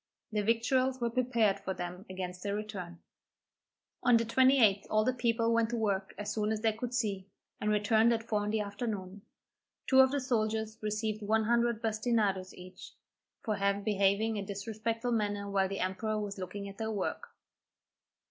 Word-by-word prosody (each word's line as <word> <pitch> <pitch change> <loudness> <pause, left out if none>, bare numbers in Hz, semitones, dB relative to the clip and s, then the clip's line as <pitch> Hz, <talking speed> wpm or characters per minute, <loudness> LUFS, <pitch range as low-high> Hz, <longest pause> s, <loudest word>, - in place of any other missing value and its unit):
Their 210 -1 0
victuals 255 +4 +1
were 235 -1 -1
prepared 230 -5 +2
for 190 -1 -4
them 180 +3 -6
against 180 -1 -5
their 200 +1 -2
return. 195 -5 -6 1.0
On 245 -2 +5
the 230 - 0
28th 235 -4 +4
all 215 0 +3
the 255 - +2
people 230 -2 +1
went 230 -1 +2
to 240 - -2
work 200 -3 -1
as 205 0 -3
soon 215 0 0
as 215 -1 -2
they 220 -1 +2
could 235 +2 -5
see, 200 -6 -1 0.3
and 210 - -1
returned 220 +2 +3
at 225 -1 0
four 210 -2 -1
in 205 - -2
the 215 0 0
afternoon. 200 -2 -5 0.6
Two 265 - +4
of 265 0 +8
the 285 +1 0
soldiers 220 -3 -1
received 215 0 -2
one 220 +2 +2
hundred 235 0 +1
bastinadoes 215 -4 0
each, 180 +1 -12 0.5
for 215 - 0 0.3
behaving 210 +1 +2
in 200 - -2
a - - -11
disrespectful 225 +4 -3
manner 205 -3 -1
while 195 -1 +1
the 195 - -3
emperor 215 +4 -1
was 205 -1 -5
looking 200 +2 -5
at 200 +1 -10
their 220 0 -2
work. 205 -4 -3
215 Hz, 175 wpm, -31 LUFS, 200-230 Hz, 1.0 s, of